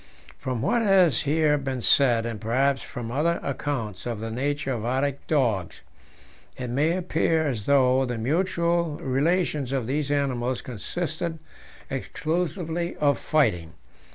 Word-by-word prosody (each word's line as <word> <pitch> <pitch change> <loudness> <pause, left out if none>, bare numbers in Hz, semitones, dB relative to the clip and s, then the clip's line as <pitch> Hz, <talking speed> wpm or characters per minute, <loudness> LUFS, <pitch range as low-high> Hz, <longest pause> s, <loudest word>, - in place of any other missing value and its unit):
From 125 -3 -3
what 235 +10 +2
has 190 - +4
here 150 0 +2
been 135 -3 -4
said, 120 +1 +4
and 115 -3 -5
perhaps 135 +4 +1
from 115 -1 -6
other 165 +6 +1
accounts 115 -8 -3
of 115 -3 -3
the 115 +1 -4
nature 140 +3 -1
of 115 -3 -4
Arctic 135 +3 -1
dogs, 115 - 0 0.8
it 125 -2 -4
may 155 +7 +2
appear 165 -2 +1
as 120 -8 -3
though 130 -2 +4
the 120 -2 -3
mutual 170 +4 0
relations 145 0 0
of 135 -4 -1
these 140 +3 -1
animals 130 -3 -1
consisted 160 - -4 0.5
exclusively 165 +4 -2
of 145 -2 +2
fighting. 90 - +1
140 Hz, 135 wpm, -25 LUFS, 120-160 Hz, 0.8 s, has